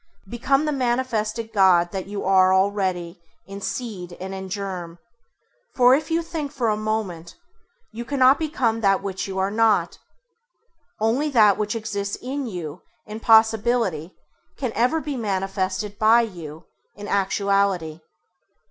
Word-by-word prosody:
Become 265 +7 0
the 305 - 0
manifested 240 -4 -1
God 180 -3 +4
that 190 -1 -5
you 200 0 -5
are 190 0 +4
already 190 -3 -1 0.2
in 195 +2 -9
seed 195 -7 -5
and 190 +1 -6
in 190 0 -6
germ; 185 -4 -5 0.8
for, 250 0 +6
if 300 +5 0
you 330 +1 0
think 320 -4 -5
for 250 -6 -1
a 210 - +1
moment, 210 -6 -4 0.6
you 230 +2 -6
cannot 260 +2 +3
become 260 -8 -1
that 195 -2 +2
which 190 -1 -4
you 190 -1 -5
are 190 +1 0
not. 220 -1 +2 1.0
Only 240 +8 +1
that 215 -7 +5
which 210 +1 -2
exists 205 -2 -3
in 270 +1 -5
you 170 -8 -6 0.2
in 215 +1 -7
possibility 220 -6 +2 0.4
can 255 -4 -2
ever 250 +8 +1
be 295 -2 -4
manifested 195 -2 -3
by 225 +2 +5
you 170 -7 -7 0.3
in 205 0 -8
actuality. 195 -5 0
210 Hz, 140 wpm, -23 LUFS, 190-235 Hz, 1.0 s, for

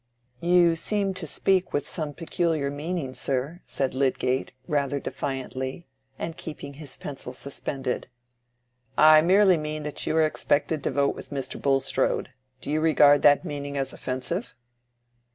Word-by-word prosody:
"You 175 0 +4
seem 195 +3 -1
to 185 -3 -4
speak 190 +4 +1
with 145 - -1
some 150 -3 -4
peculiar 165 -4 -1
meaning, 150 -2 -3
sir," 135 +7 -2
said 135 -2 -1
Lydgate, 130 -1 0 0.2
rather 140 -1 0
defiantly, 135 +3 -4 0.3
and 165 - -4
keeping 145 -3 -8
his 145 -1 -5
pencil 135 -3 -7
suspended. 135 -1 -4 0.9
"I 155 0 +8
merely 190 +2 +5
mean 155 0 -4
that 150 0 -2
you 160 - +1
are 160 - +5
expected 155 0 0
to - - +2
vote 140 0 +1
with - - -10
Mr. 140 -2 -4
Bulstrode. 135 -2 +1 0.3
Do - - -4
you 155 +1 +1
regard 145 -3 +5
that 145 +4 +5
meaning 145 -3 -4
as 135 -1 -2
offensive?" 130 - -4
145 Hz, 145 wpm, -26 LUFS, 135-165 Hz, 0.9 s, I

